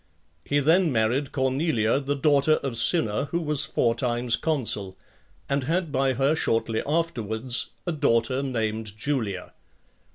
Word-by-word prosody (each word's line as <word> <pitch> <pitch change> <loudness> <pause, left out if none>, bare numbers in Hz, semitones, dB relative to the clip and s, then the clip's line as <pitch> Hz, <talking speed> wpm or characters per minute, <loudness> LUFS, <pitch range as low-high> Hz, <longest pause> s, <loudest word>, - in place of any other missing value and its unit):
He 145 - 0
then 160 +4 +3
married 120 +4 +1
(2) - - -16
Cornelia, 130 -3 +1
the 140 0 -2
daughter 145 +1 +3
of 135 -4 -3
Cinna, 115 -1 +2
who 170 +4 -2
was 150 -4 +1
four 115 - +1
times 120 0 0
consul; 110 - -1 0.5
and 140 -1 -1
had 170 +1 -1
by 135 -1 +1
her, 135 +4 +1
shortly 115 -5 0
afterwards, 125 -7 0 0.2
a 175 - -1
daughter 130 -3 +1
named 110 -5 -3
Julia. 110 -7 -3
130 Hz, 140 wpm, -25 LUFS, 115-145 Hz, 0.5 s, then